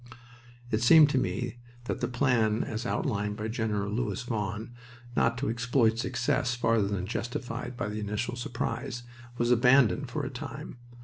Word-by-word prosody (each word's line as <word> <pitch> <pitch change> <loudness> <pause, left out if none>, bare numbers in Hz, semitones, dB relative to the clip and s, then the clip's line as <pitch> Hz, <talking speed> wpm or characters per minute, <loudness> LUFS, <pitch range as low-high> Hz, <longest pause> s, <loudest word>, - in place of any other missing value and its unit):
It 110 - +1
seemed 150 +4 +7
to 135 - +3
me 120 -1 -2 0.3
that - - -3
the - - +1
plan 120 -4 +2
as 110 +2 -4
outlined 105 - -1
by 110 0 -3
Gen. 110 -1 -1 0.2
Louis 105 0 -2
Vaughan, 110 -1 -3 0.4
not 115 +1 +2
to 140 - -2
exploit 115 0 +2
success 125 0 0
farther 115 -4 +2
than 100 -2 -2
justified 120 +3 -4
by - - -2
the 105 +1 -4
initial 105 +4 -2
surprise, 120 +1 -3 0.3
was 120 0 +1
abandoned 125 +2 +4
for 145 +4 -3
a 130 - -4
time. 130 0 -7
120 Hz, 160 wpm, -29 LUFS, 110-125 Hz, 0.4 s, seemed